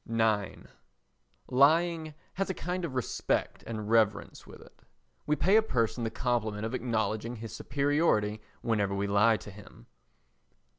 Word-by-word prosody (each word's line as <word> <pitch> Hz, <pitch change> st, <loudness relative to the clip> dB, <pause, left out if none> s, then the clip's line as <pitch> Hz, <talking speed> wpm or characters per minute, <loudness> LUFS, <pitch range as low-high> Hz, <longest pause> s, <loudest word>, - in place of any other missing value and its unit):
ix 110 Hz, -3 st, 0 dB, 0.8 s
Lying 155 Hz, +3 st, +3 dB, 0.2 s
has 195 Hz, +1 st, -2 dB
a 190 Hz, -, -2 dB
kind 180 Hz, +1 st, -3 dB
of 135 Hz, -6 st, -6 dB
respect 125 Hz, -5 st, -1 dB
and 110 Hz, -2 st, -5 dB
reverence 110 Hz, -2 st, +1 dB
with -, -, -12 dB
it. -, -, -18 dB, 0.5 s
We 150 Hz, -, +3 dB
pay 180 Hz, +9 st, +4 dB
a -, -, +6 dB
person 120 Hz, -, -1 dB
the 115 Hz, -, 0 dB
compliment 110 Hz, -3 st, -1 dB
of 115 Hz, -, -4 dB
acknowledging 115 Hz, -2 st, -1 dB
his 115 Hz, -1 st, -8 dB
superiority 140 Hz, -8 st, +1 dB, 0.2 s
whenever 105 Hz, -4 st, 0 dB
we 100 Hz, +1 st, -1 dB
lie 105 Hz, +3 st, +4 dB
to 105 Hz, -, -11 dB
him. 100 Hz, -11 st, -15 dB
115 Hz, 145 wpm, -29 LUFS, 105-145 Hz, 0.8 s, a